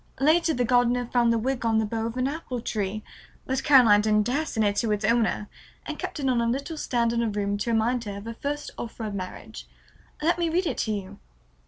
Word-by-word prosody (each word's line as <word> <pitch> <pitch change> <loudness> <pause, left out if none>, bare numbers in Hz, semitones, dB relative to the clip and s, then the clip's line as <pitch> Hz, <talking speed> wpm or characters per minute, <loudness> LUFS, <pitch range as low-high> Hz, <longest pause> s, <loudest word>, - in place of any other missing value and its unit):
Later 320 +3 +3
the 245 - +1
gardener 245 0 +2
found 235 -1 +2
the 230 - +2
wig 255 +3 -2
on 225 -1 +2
the 220 - +2
bough 225 +1 -2
of 230 +2 -6
an 255 +1 +1
apple 275 -4 -4
tree, 215 -2 -3 0.4
but 265 0 -1
Caroline 245 -8 +6
didn't 210 0 +2
dare 285 +6 0
send 220 -1 0
it 200 0 +1
to 225 0 +1
its 210 0 0
owner 225 -2 +1 0.4
and - - -6
kept - - -5
it 275 - -1
on 250 -2 +2
a 235 - +1
little 275 +7 -2
stand 235 -5 0
in 235 - +1
her 230 - 0
room 205 -1 -1
to 235 +3 -1
remind 230 +2 +1
her 200 -1 -5
of 200 - -9
her 230 - -5
first 290 +5 -4
offer 230 0 -6
of 210 -2 -4
marriage. 185 -2 -7 0.5
Let 335 +3 +1
me 340 -1 +1
read 355 +3 +1
it - - -2
to 220 - 0
you." 200 -3 -5
235 Hz, 240 wpm, -26 LUFS, 215-265 Hz, 0.5 s, Caroline